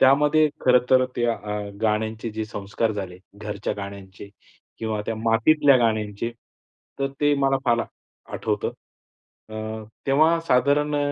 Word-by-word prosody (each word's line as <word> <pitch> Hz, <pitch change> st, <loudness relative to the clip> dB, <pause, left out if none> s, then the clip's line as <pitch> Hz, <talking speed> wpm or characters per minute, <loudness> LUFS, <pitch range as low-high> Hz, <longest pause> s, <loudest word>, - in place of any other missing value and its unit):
त्यामध्ये 150 Hz, +3 st, +5 dB
खरं 125 Hz, 0 st, +5 dB
तर 130 Hz, 0 st, +6 dB
त्या 120 Hz, -1 st, +1 dB
अ, 105 Hz, 0 st, -5 dB
गाण्यांचे 110 Hz, +1 st, -1 dB
जे 110 Hz, 0 st, -4 dB
संस्कार 105 Hz, +2 st, -2 dB
झाले, 95 Hz, -3 st, -6 dB, 0.2 s
घरच्या 105 Hz, -1 st, -4 dB
गाण्यांचे 100 Hz, 0 st, -9 dB, 0.5 s
किंवा 110 Hz, -2 st, -2 dB
त्या 115 Hz, -, -1 dB
मातीतल्या 120 Hz, +6 st, +4 dB
गाण्यांचे, 110 Hz, -1 st, 0 dB, 0.7 s
तर 135 Hz, -, +1 dB
ते 145 Hz, 0 st, +4 dB
मला 135 Hz, 0 st, +3 dB
फार 120 Hz, -2 st, +3 dB, 0.5 s
आठवतं. -, -, -1 dB, 0.8 s
अं, 110 Hz, 0 st, -6 dB, 0.2 s
तेव्हा 155 Hz, +5 st, +4 dB
साधारण 145 Hz, +3 st, +3 dB
अ, -, -, +1 dB
115 Hz, 130 wpm, -24 LUFS, 105-135 Hz, 0.8 s, तर